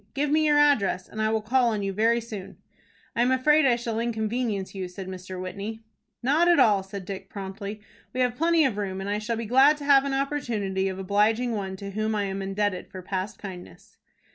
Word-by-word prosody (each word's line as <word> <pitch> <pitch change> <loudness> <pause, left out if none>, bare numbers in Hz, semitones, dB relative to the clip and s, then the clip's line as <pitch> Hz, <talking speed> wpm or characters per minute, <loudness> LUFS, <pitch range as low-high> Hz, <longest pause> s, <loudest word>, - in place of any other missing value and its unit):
Give 285 +1 0
me 310 0 +3
your 295 -1 +4
address, 235 -11 +3
and 215 - -5
I 215 - +2
will 220 -1 0
call 245 +3 +3
on 210 -3 -2
you 195 0 -2
very 225 +4 +3
soon." 215 -4 -8 0.6
"I 235 - +2
am 245 - +3
afraid 280 +3 +4
I 245 - +4
shall 235 -2 -3
inconvenience 220 -3 -2
you," 190 -2 -4
said 185 +1 -8
Mr. 185 0 -7
Whitney. 200 +4 -6 0.4
"Not 300 +7 +3
at 345 -1 +5
all," 205 -3 +5
said 195 0 -8
Dick, 195 0 -7
promptly. 200 +1 -6 0.3
"We 255 - -2
have 250 -1 +2
plenty 330 +2 +3
of 235 -6 0
room, 190 -2 -3
and 195 - -5
I 205 +1 -1
shall 225 +2 -2
be 230 - -4
glad 265 +6 +5
to 290 - -8
have 275 -1 +6
an 275 -1 -1
opportunity 230 -9 -1
of 190 -1 -4
obliging 210 +5 +1
one 195 -3 -3
to 200 +1 -7
whom 215 +2 -1
I 205 - 0
am 195 0 -3
indebted 195 -1 -2
for 185 -1 -9
past 190 +2 -3
kindness." 180 - -11
215 Hz, 220 wpm, -26 LUFS, 195-250 Hz, 0.6 s, have